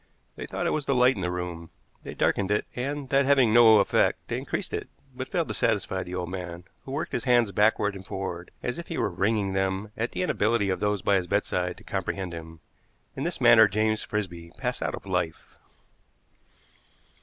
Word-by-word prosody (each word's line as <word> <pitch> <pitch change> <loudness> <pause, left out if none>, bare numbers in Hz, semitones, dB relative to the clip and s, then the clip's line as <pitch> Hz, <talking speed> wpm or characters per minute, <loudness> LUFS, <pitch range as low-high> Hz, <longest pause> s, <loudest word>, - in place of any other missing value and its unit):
They - - -7
thought - - -3
it - - +1
was 150 -2 -2
the 135 - +2
light 125 +1 +5
in 100 - -6
the 90 - -1
room. 90 -2 -5 0.3
They - - -8
darkened 100 -1 +1
it, 105 0 +1
and, 140 +2 -3
that 140 0 +4
having 135 -5 +4
no 115 -2 +8
effect, 100 - +3
they - - -1
increased - - -4
it, - - -4 0.3
but 130 0 -5
failed 170 -3 -1
to - - -2
satisfy 100 -4 0
the 90 0 -6
old 90 -1 -3
man, 90 -2 -6 0.2
who 130 - -7
worked 140 +3 -3
his 120 - -2
hands 120 -4 +4
backward 105 0 +2
and 95 - -8
forward 90 -3 -5
as 125 - -3
if 170 - -8
he 165 - -4
were - - 0
wringing 100 +1 0
them 95 +2 -1
at 115 +2 -3
the - - -1
inability 110 - +1
of 95 - -2
those 105 -2 0
by 100 - +3
his 90 -2 -2
bedside - - -1
to - - -15
comprehend 95 -3 -3
him. 80 -1 -9 0.5
In 135 - -3
this 175 - -2
manner 115 -3 +7
James 110 +2 0
Frisby 85 -5 -4
passed - - -2
out - - -1
of - - -11
life. 80 - -3
105 Hz, 210 wpm, -26 LUFS, 95-125 Hz, 0.5 s, no